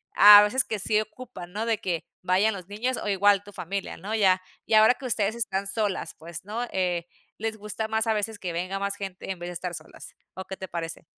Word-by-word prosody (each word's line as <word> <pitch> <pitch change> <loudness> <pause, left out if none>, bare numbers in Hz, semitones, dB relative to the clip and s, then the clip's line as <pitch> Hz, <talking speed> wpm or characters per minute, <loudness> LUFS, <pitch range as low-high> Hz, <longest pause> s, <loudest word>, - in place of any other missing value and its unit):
a 205 0 +11
veces 250 +5 +2
que 215 - -4
sí 215 +2 +2
ocupan, 215 -5 -10
¿no?, 215 +2 -2
de 225 -2 0
que 175 -3 -3 0.2
vayan 190 +4 +2
los 185 -3 -8
niños 230 +5 -2
o - - -5
igual 200 0 +4
tu 205 - -13
familia, 195 +2 -4
¿no? 200 +6 -6
Ya, 190 -4 +4 0.2
y - - -2
ahora 220 +3 +7
que 265 - -10
ustedes 215 -3 0
están 200 -4 -1
solas, 205 -1 -1
pues, 165 +1 -8
¿no?, 220 +4 -3
eh, 175 -2 -1 0.3
¿les 220 0 -3
gusta 210 +1 -4
más, 220 +1 +1
a 220 - +3
veces, 210 0 -2
que 180 -2 -4
venga 185 +3 -3
más 200 0 -2
gente 195 -2 -6
en 185 - -6
vez 175 +1 -5
de - - -6
estar 175 +1 -5
solas, 155 -2 -10 0.2
o 190 - -5
qué 190 - -7
te 190 - -6
parece? 165 -1 -5
200 Hz, 235 wpm, -26 LUFS, 185-220 Hz, 0.3 s, a